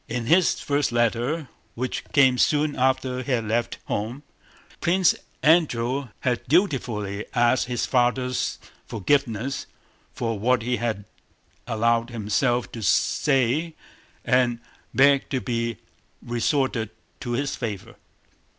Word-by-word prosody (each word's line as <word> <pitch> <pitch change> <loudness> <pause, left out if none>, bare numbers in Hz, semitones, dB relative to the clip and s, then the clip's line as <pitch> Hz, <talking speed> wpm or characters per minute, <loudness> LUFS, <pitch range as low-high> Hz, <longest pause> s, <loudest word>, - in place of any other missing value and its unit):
In 120 0 -3
his 175 +7 +3
first 145 -2 0
letter 120 +6 0 0.3
which 125 +2 -3
came 130 -3 +4
soon 150 0 +2
after 130 0 0
he 130 - -5
had 115 -3 -1
left 115 +2 -1
home, 115 +7 -3 0.6
Prince 185 +1 +3 0.3
Andrew 140 -5 +2
had 125 -2 0
dutifully 120 - 0
asked 120 +1 +3
his 120 -2 -1
father's 125 0 0 0.3
forgiveness 130 +2 -1 0.4
for 115 -3 -3
what 120 +2 +2
he 125 +1 0
had 110 -4 -3 0.6
allowed 115 0 +1
himself 120 +2 0
to 115 - -7
say 140 - +1 0.5
and 125 -2 +2 0.3
begged 140 0 +4
to 135 - 0
be 115 -3 -2 0.5
restored 120 -1 0 0.3
to 120 - -5
his 140 +3 -1
favor. 105 -6 -5
125 Hz, 115 wpm, -24 LUFS, 115-140 Hz, 0.6 s, came